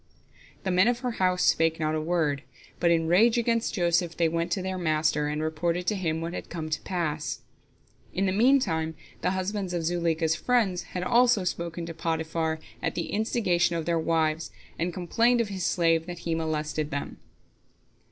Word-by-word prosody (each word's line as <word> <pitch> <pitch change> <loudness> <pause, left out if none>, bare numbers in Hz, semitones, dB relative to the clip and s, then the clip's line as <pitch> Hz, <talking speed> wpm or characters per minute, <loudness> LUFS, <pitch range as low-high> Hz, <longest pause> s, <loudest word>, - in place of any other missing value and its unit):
The 190 - 0
men 185 +4 +4
of 245 0 +1
her 250 -1 -1
house 180 -1 +2
spake 165 0 +3
not 155 -1 0
a 155 - 0
word, 155 -4 0 0.4
but, 170 - +3
in 165 -1 +3
a - - -3
rage 220 +8 +4
against 230 -1 +1
Joseph, 175 -2 +1
they 170 - +3
went 170 +1 -1
to 185 - -2
their 190 0 -3
master, 155 -2 +1
and 150 +1 -2
reported 170 +3 -1
to 210 - +1
him 165 -4 -1
what 165 +1 -4
had - - -6
come 160 -2 -5
to - - -1
pass. 160 -5 -3 0.7
In 195 - 0
the 190 - +1
meantime 190 -9 +2 0.3
the - - +1
husbands 190 0 -2
of 170 - -1
Zuleika's 165 -1 +1
friends 215 -5 +1 0.2
had 180 - -2
also 240 -1 +4
spoken 170 -1 -3
to 165 - -6
Potiphar, 160 0 -1 0.2
at - - -2
the 170 - -3
instigation 185 -6 +1
of 165 -2 -2
their 170 0 +1
wives, 160 -1 0 0.3
and 170 +2 0
complained 230 +8 +2
of 230 -3 0
his 190 -3 -2
slave, 165 -1 +2
that 175 -1 -6
he 165 - 0
molested 155 -1 -2
them. 140 0 -4
170 Hz, 190 wpm, -27 LUFS, 160-185 Hz, 0.7 s, men